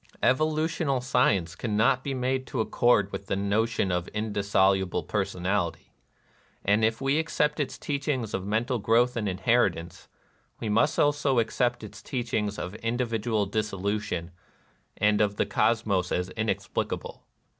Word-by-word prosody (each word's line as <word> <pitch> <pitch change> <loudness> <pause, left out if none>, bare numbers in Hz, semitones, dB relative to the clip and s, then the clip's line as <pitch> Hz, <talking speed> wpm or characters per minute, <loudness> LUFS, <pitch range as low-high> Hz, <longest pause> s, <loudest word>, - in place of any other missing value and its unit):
Evolutional 155 0 +1
science 105 -9 +1
cannot 115 +6 +1
be 140 -1 -2
made 130 +1 -1
to - - -4
accord 110 -2 +2
with 100 - -6
the - - 0
notion 100 +1 0
of 90 0 -1
indissolu 100 -3 +2
ble - - -2
personality; 95 -3 -2 0.7
and 105 +3 +3
if 110 +2 +1
we 135 +3 +2
accept 150 -2 0
its 145 - -2
teaching 140 -3 -2
of 100 -3 -4
mental 115 +5 0
growth 115 +4 +3
and 105 -4 -1
inheritance, 95 -3 0 0.5
we 110 - -3
must 115 +7 +2
also 145 -2 +2
accept 120 +1 +1
its 105 -1 -10
teaching 115 -4 -2
of 90 - -5
individual 115 -3 -1
dissolu 105 0 -1
tion 85 -3 -4 0.7
and 105 0 +3
of 105 -1 +1
the - - +1
cosmos 100 -3 +1
as 90 +1 -1
inexplicable. 110 +1 -3
110 Hz, 140 wpm, -27 LUFS, 100-125 Hz, 0.7 s, and